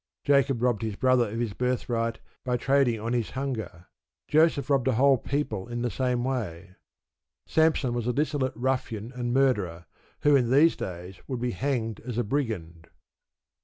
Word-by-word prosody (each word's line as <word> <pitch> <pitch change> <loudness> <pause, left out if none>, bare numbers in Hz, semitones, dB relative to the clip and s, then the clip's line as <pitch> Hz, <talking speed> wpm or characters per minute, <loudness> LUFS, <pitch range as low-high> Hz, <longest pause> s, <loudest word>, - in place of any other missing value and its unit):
Jacob 135 -3 +2
robbed 120 -5 +2
his 110 -3 -3
brother 130 -1 +3
of 115 +3 -4
his 115 -4 -2
birthright 120 -2 -1 0.2
by 125 -1 0
trading 135 -3 +2
on 115 +3 -3
his 120 -3 0
hunger; 110 -11 -4 0.4
Joseph 155 -2 +3
robbed 135 -3 +2
a 130 - +3
whole 135 +2 +4
people 115 -9 -2
in 120 0 -4
the 120 - -1
same 125 -2 0
way. 100 -9 -4 0.7
Samson 160 -6 +2
was 120 -1 -2
a - - +2
dissolute 145 -2 0
ruffian 120 -2 -2
and 120 -2 -3
murderer, 105 -11 +1 0.4
who 145 -1 +5
in 125 -4 +2
these 145 +6 +5
days 90 +1 -7
would 130 -3 -3
be 120 0 -1
hanged 115 -1 -2
as 125 -3 -6
a 120 - +2
brigand. 100 - -3
120 Hz, 165 wpm, -27 LUFS, 110-135 Hz, 0.7 s, who